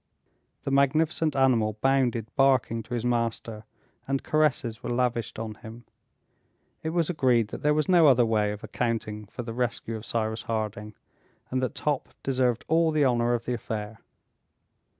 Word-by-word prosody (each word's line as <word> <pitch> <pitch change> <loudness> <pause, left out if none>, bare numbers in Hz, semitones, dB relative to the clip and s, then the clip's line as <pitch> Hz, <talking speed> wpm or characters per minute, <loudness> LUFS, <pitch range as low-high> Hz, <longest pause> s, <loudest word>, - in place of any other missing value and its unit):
The - - -3
magnificent 155 +2 +2
animal 120 -5 +3
bounded 130 -4 +2
barking 130 -4 +3
to 120 +2 -5
his 120 0 -3
master, 115 -2 -2 0.4
and 135 0 -1
caresses 135 -7 +1
were - - -5
lavished 120 -2 -1
on 110 -1 -4
him. 115 +2 -12 1.0
It 160 - -2
was 165 -1 +1
agreed 125 -9 +2
that - - -7
there 150 0 +3
was 155 -1 +1
no 175 -4 +6
other 125 -3 +5
way 105 -2 +1
of 105 0 -8
accounting 110 -3 -3
for 120 - -7
the 115 -1 -6
rescue 120 -1 -2
of 110 - -7
Cyrus 110 -1 -2
Harding, 105 -1 -4 0.6
and 130 0 0
that 130 - -2
Top 145 -3 -2
deserved 125 -3 0
all 165 +1 +3
the 155 -2 +2
honor 120 -1 +2
of 115 - -5
the 125 - -1
affair. 110 -1 -5
120 Hz, 165 wpm, -27 LUFS, 110-135 Hz, 1.0 s, no